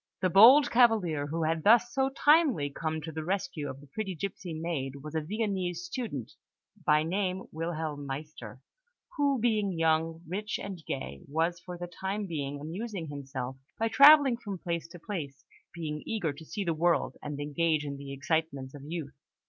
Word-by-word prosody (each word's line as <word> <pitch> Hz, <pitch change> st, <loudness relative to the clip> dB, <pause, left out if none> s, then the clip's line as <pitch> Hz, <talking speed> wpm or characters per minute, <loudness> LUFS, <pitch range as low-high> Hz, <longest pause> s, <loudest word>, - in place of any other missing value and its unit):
The 185 Hz, -2 st, +1 dB
bold 245 Hz, +9 st, +8 dB
cavalier 205 Hz, -, +3 dB
who 165 Hz, +2 st, -2 dB
had 160 Hz, 0 st, 0 dB
thus 235 Hz, +3 st, +5 dB
so 270 Hz, -1 st, +2 dB
timely 275 Hz, -, +3 dB
come 155 Hz, +2 st, -3 dB
to 160 Hz, +1 st, -6 dB
the 160 Hz, 0 st, -5 dB
rescue 170 Hz, -4 st, -2 dB
of 135 Hz, -, -7 dB
the 145 Hz, -, -14 dB
pretty 190 Hz, +6 st, -4 dB
gipsy 185 Hz, +1 st, -5 dB
maid 155 Hz, -5 st, -3 dB
was 150 Hz, 0 st, -7 dB
a 160 Hz, -, 0 dB
Viennese 185 Hz, -1 st, -2 dB
student, 165 Hz, -, -5 dB, 0.5 s
by 150 Hz, 0 st, +4 dB
name 185 Hz, +2 st, -1 dB
Wilhelm 160 Hz, -3 st, -4 dB
Meister, 135 Hz, -4 st, -7 dB, 0.5 s
who, 285 Hz, -2 st, +2 dB
being 210 Hz, -6 st, +1 dB
young, 165 Hz, 0 st, +1 dB
rich, 210 Hz, +5 st, -3 dB
and 190 Hz, -4 st, -7 dB
gay, 70 Hz, -, -4 dB
was 165 Hz, +4 st, 0 dB
for 175 Hz, 0 st, -8 dB
the 175 Hz, -, -5 dB
time 190 Hz, +4 st, -4 dB
being 145 Hz, -5 st, -4 dB
amusing 175 Hz, +2 st, -5 dB
himself 135 Hz, -2 st, -5 dB, 0.2 s
by 225 Hz, 0 st, 0 dB
travelling 280 Hz, 0 st, +8 dB
from 205 Hz, -5 st, -6 dB
place 170 Hz, -2 st, -3 dB
to 175 Hz, +1 st, -11 dB
place, 160 Hz, -7 st, -6 dB, 0.3 s
being 150 Hz, -3 st, -5 dB
eager 175 Hz, -10 st, -1 dB
to 155 Hz, +3 st, -12 dB
see 205 Hz, +5 st, -4 dB
the 170 Hz, -3 st, 0 dB
world 170 Hz, +2 st, +1 dB
and 150 Hz, -1 st, -5 dB
engage 150 Hz, +1 st, 0 dB
in 140 Hz, -1 st, -5 dB
the 140 Hz, 0 st, -8 dB
excitements 140 Hz, -1 st, -2 dB
of 145 Hz, -, -10 dB
youth. 150 Hz, -2 st, -5 dB
165 Hz, 175 wpm, -29 LUFS, 150-200 Hz, 0.5 s, bold